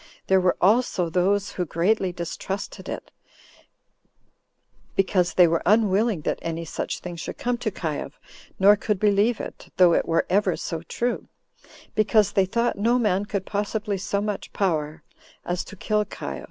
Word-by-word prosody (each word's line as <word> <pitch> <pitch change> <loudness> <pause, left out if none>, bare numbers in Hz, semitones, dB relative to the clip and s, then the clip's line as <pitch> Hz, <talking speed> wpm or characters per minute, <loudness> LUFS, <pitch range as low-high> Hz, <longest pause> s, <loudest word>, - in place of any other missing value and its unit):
There 190 -1 +4
were 180 -1 +2
also 190 -4 +2
those 195 +3 +1
who 180 - -2
greatly 185 +4 +1
distrusted 175 +3 -5
it, - - -6 1.8
because 185 -2 +1
they 180 -2 +7
were 165 0 +1
unwilling 210 -2 +3
that - - -2
any 165 0 -4
such - - -4
thing 180 -1 -6
should - - -6
come 245 0 -1
to 240 - -1
Caius, 155 -8 -4 0.5
nor 200 +2 +7
could 210 -1 -2
believe 210 +2 +3
it, - - -8
though 180 -2 +6
it - - +1
were 165 0 +2
ever 190 -2 +2
so 165 -1 -4
true, 240 +8 -3 0.7
because 215 -1 +3
they 195 - +3
thought 235 +3 0
no 235 +4 +3
man 205 -4 +1
could 200 -2 -3
possibly 205 0 -2
so 200 +1 -1
much 210 -1 -4
power 155 -5 -1 0.4
as 175 0 -2
to 205 - -11
kill 210 +1 0
Caius. 205 - -6
195 Hz, 160 wpm, -24 LUFS, 175-210 Hz, 1.8 s, they